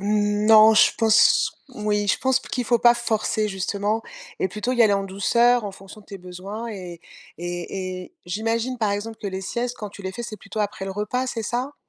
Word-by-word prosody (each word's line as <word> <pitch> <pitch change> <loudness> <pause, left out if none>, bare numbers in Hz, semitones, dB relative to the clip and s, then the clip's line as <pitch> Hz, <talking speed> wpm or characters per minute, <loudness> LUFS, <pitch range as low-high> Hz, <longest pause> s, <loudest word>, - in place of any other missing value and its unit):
Non, 210 +2 +5
je - - +6
pense, 220 -1 +4 0.2
oui, 210 -4 -1
je - - +2
pense 265 -1 +2
p - - -13
qu'il 250 - -1
faut 240 +1 +2
pas 240 0 +6
forcer 220 -2 -1
justement 205 +2 -2 0.4
et 190 - +1
plutôt 215 +6 -3
y 240 -2 +4
aller 215 -3 +5
en 195 0 0
douceur 235 +5 +2
en 205 - -3
fonction 195 +2 -13
de 200 - -21
tes 195 -2 -9
besoins 185 +5 -7
et 180 -6 -8 0.4
et 180 +1 -5
et - - -37
j'imagine 225 +6 -1
par 220 -4 0
exemple 215 +2 -4
que 205 - -2
les 190 0 -4
siestes 240 +5 -3
quand 210 -2 -6
tu 200 - -12
les 190 - -3
fais, 240 +4 -6
c'est 215 -2 -7
plutôt 200 +2 -9
après 205 -2 -2
le 195 - -4
repas, 210 +6 -2
c'est 225 -3 -4
ça? 250 +6 -3
210 Hz, 215 wpm, -23 LUFS, 195-230 Hz, 0.4 s, je